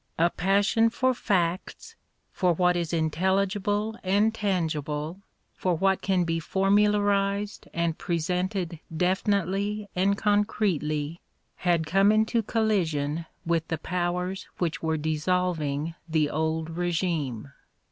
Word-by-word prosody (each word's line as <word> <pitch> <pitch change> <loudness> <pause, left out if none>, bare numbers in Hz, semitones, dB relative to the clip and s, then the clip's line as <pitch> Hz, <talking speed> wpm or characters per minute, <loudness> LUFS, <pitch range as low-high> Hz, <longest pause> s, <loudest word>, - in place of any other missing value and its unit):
A 170 +1 +3
passion 200 +5 +3
for 260 +3 +1
facts, 185 -6 -1 0.4
for 180 -3 +2
what 180 +1 +2
is 170 -2 -1
intelligible 195 +6 0
and 205 +4 +2
tangible, 160 -5 -2 0.3
for 180 -2 0
what 190 +3 +2
can 190 -2 +1
be 165 -1 -1
formu 195 +5 +3
larised 205 0 0
and 170 -2 -1
presented 180 0 -2 0.2
definitely 200 +3 0
and 195 +2 +2
concretely, 175 -8 0 0.4
had 170 -3 +1
come 195 +5 +4
into 220 +2 +2
collision 170 -9 0 0.2
with 165 -1 0
the 165 - -2
powers 180 +2 -2
which 165 -4 -2
were 160 -1 0
dissolving 155 -1 -1 0.2
the 155 -2 +1
old 160 +1 -1
regime. 160 - -2
180 Hz, 115 wpm, -27 LUFS, 160-200 Hz, 0.4 s, come